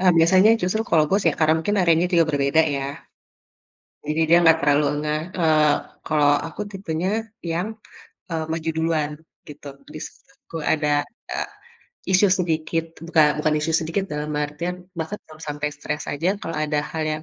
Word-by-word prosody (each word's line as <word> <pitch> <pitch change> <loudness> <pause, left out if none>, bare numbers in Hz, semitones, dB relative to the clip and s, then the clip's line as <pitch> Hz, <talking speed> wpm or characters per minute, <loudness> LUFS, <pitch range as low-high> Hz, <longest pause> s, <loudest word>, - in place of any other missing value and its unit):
eee, 185 -1 +5
biasanya 185 +6 +6
justru 185 +5 0
kalau 160 -9 +3
bos 195 0 +2
ya - - +2
karena 155 0 +4
mungkin 205 +5 -1
areanya 170 0 +3
juga 170 -2 +5
berbeda 140 +3 +3
ya. 135 - -3 1.2
Jadi 155 +2 -1
dia 170 - +7
nggak 165 -1 +6
terlalu 145 0 +3
ngeh, 150 0 -1 0.2
eee, 155 -2 +4 0.3
kalau 150 -2 +3 0.2
aku 165 +6 -9
tipenya 185 -3 -3 0.4
yang, 175 +4 -1 0.7
eee, 160 -1 -2
maju 165 0 -2
duluan 160 -2 0 0.4
gitu. 145 -1 -10 0.2
Di - - -7
situ 165 - -12
ada, 150 -2 +1 0.3
eee, - - -3 0.6
isu 190 +2 +5
sedikit 165 -1 -1 0.2
bukan 150 -3 +3
bukan 155 0 +1
isu 160 +2 -1
sedikit, 165 +5 -2
dalam 150 0 -3
artian 170 +5 -4
bahkan 165 +6 -3
kalau 155 0 -15
sampai 150 0 -3
stres 150 +1 -4
aja 170 +8 0
kalau 165 - -4
ada 150 -1 0
hal 160 - -3
yang, 155 0 -4
160 Hz, 165 wpm, -23 LUFS, 150-170 Hz, 1.2 s, dia